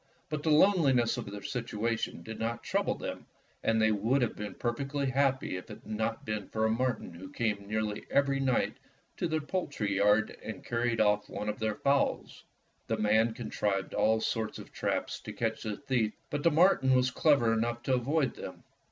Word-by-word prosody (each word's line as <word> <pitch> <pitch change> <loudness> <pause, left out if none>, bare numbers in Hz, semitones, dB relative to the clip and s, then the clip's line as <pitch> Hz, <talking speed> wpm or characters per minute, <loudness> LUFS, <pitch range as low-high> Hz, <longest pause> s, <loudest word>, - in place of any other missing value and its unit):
But 155 -1 -2
the 160 - 0
loneli 155 -3 +5
ness 120 -1 +2
of 120 -4 -5
their 100 0 -7
situation 115 -1 -2
did 110 0 -7
not 115 +1 -2
trouble - - 0
them, - - -6 0.3
and 115 0 +2
they 110 0 +4
would 115 +6 +2
have 120 - -1
been 105 0 -6
perfectly 140 +4 -2
happy 135 -6 +1
if 90 - -8
it 105 - -10
had - - -23
not 110 +1 -2
been 105 -2 -3
for 110 0 0
a 110 - +2
marten 120 -6 -1
who 95 +3 -10
came 105 -3 -1
nearly 110 0 -2
every 140 -1 +2
night 130 -2 +1 0.4
to 175 - 0
their 160 -1 0
poultry 145 - -2
yard 105 +2 +3
and 110 - -7
carried 120 0 0
off 105 -1 +2
one 105 - -4
of 105 - -4
their 110 -1 0
fowls. 140 0 0 0.4
The 115 - 0
man 110 +2 +3
contrived 105 -4 -2
all 110 +1 +3
sorts 110 -1 -2
of - - -11
traps - - -2
to - - -8
catch 115 -1 -2
the 105 -2 -3
thief, 125 -6 0 0.2
but 145 - -1
the 170 - +5
marten 150 -5 +4
was 125 0 +3
clever 130 -6 +3
enough 120 +1 -1
to 130 - +1
avoid 135 +2 +1
them. - - -9
115 Hz, 195 wpm, -30 LUFS, 110-135 Hz, 0.4 s, loneli